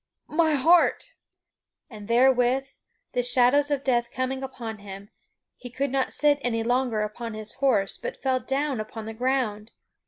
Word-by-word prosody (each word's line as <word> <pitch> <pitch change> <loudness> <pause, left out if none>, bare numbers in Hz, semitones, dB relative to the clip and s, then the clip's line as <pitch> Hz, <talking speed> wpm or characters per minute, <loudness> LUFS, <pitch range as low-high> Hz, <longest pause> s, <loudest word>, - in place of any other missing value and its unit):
My 315 -1 +3
heart!" 330 +6 +3 0.7
And 210 -3 -11
therewith, 250 +2 +3 0.5
the 250 - 0
shadows 250 +4 +3
of 285 -2 -1
death 240 -2 +1
coming 255 +1 -3
upon 235 -5 -6
him, 200 0 -10 0.5
he 245 - -9
could 270 +2 -2
not 270 -1 0
sit 295 -1 +2
any 230 -3 -1
longer 245 -2 0
upon 220 +1 -5
his 215 0 -7
horse, 230 -8 +1
but - - -7
fell 260 -1 +1
down 270 -1 -2
upon 215 0 -6
the 225 - -6
ground. 235 -3 -1
250 Hz, 155 wpm, -25 LUFS, 225-270 Hz, 0.7 s, My